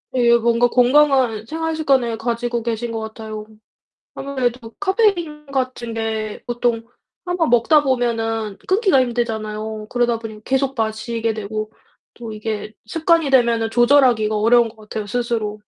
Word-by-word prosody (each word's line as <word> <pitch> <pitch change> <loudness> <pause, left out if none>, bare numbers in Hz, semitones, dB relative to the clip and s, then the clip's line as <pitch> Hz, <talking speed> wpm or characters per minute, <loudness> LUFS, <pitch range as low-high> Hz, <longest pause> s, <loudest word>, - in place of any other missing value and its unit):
예. 235 -2 +5
뭔가 235 +1 +2
건강한 255 -3 +3
생활 325 +4 -3
습관을 265 -7 +1
가지고 235 0 -2
계신 235 0 -3
것 225 - -3
같아요. 220 -1 -7 0.7
아무래도 250 -4 -3
카페인 380 -7 +1
같은 255 -4 -3
게 220 -1 -3
보통 235 -1 -1 0.4
1 355 0 -2
번 325 - +1
먹다 245 +6 +4
보면은 225 -5 -1
끊기가 380 - +3
힘들잖아요. 220 -3 -3
그러다 240 -2 +1
보니 215 -1 -9
계속 270 0 0
마시게 225 +1 -2
되고 215 0 -5 0.4
또 230 -2 -8
이게 215 0 -5
습관이 325 +4 +1
되면은 235 -3 +3
조절하기가 240 -3 +4
어려운 230 +2 +4
것 220 - -18
같아요 215 0 -6
스스로. 220 -2 -2
235 Hz, 315 characters per minute, -20 LUFS, 220-260 Hz, 0.7 s, 예